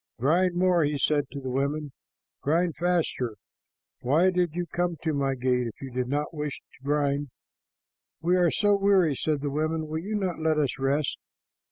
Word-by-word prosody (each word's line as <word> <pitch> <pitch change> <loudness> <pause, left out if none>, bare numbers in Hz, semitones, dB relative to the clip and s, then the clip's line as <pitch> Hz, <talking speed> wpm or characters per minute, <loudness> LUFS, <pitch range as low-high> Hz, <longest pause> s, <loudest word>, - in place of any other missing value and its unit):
"Grind 175 +8 +2
more," 180 -2 +3
he 145 0 0
said 145 +1 +1
to 140 - -6
the 130 -2 -5
women. 140 +2 -1 0.5
"Grind 165 +3 +1
faster. 165 -9 0 0.6
Why 160 +9 +3
did 175 -3 0
you 175 0 -1
come 175 +1 -2
to 160 -1 0
my 135 -1 0
gate 125 -1 +1
if 115 - -9
you 135 -1 -7
did 125 0 -2
not 145 +5 -2
wish 150 -2 -4
to - - -24
grind?" 145 0 0 0.9
"We 175 +3 +2
are 175 -2 +4
so 205 +4 +3
weary," 195 -5 +3
said 150 +1 -1
the 145 -1 -2
women. 155 +2 -1
"Will 155 +1 -3
you 205 +6 -4
not 185 -5 -1
let 160 -1 +1
us 140 -3 0
rest?" 140 +2 0
150 Hz, 185 wpm, -27 LUFS, 140-175 Hz, 0.9 s, are